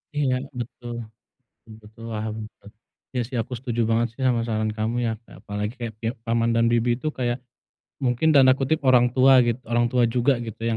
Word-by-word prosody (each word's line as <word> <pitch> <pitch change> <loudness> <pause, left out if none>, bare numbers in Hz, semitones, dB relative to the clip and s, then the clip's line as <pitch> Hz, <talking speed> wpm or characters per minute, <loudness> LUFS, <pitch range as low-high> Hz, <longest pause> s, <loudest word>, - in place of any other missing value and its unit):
Iya, 140 -3 +1 0.2
betul, 120 0 -6 0.7
betul 115 - -13
betul 110 +2 -14
paham 110 0 -3 0.3
bet 100 - -13 0.4
iya 125 - -1
sih 125 +1 -6
aku 125 - -14
setuju 120 -1 -3
banget 115 +1 +2
sih 135 - -14
sama 120 -2 +2
saran 110 -1 -1
kamu 110 +2 -1
ya 115 - 0 0.2
ya - - -15
apalagi 105 +1 -4
kayak 115 -3 -5
pihak 115 +3 -3
paman 115 0 +1
dan 115 - +3
bibi 120 +1 +2
itu 130 - -7
kayak, 120 -1 0 0.7
mungkin 125 +5 +2
tanda 130 -2 +7
kutip 140 +4 +1
"orang 125 -1 +6
tua" 130 +1 +6
gitu, 120 +1 -1
orang 120 0 +3
tua 125 0 +2
juga 125 +3 +3
gitu 110 - -8
yang 115 - 0
120 Hz, 200 wpm, -24 LUFS, 115-125 Hz, 0.7 s, tanda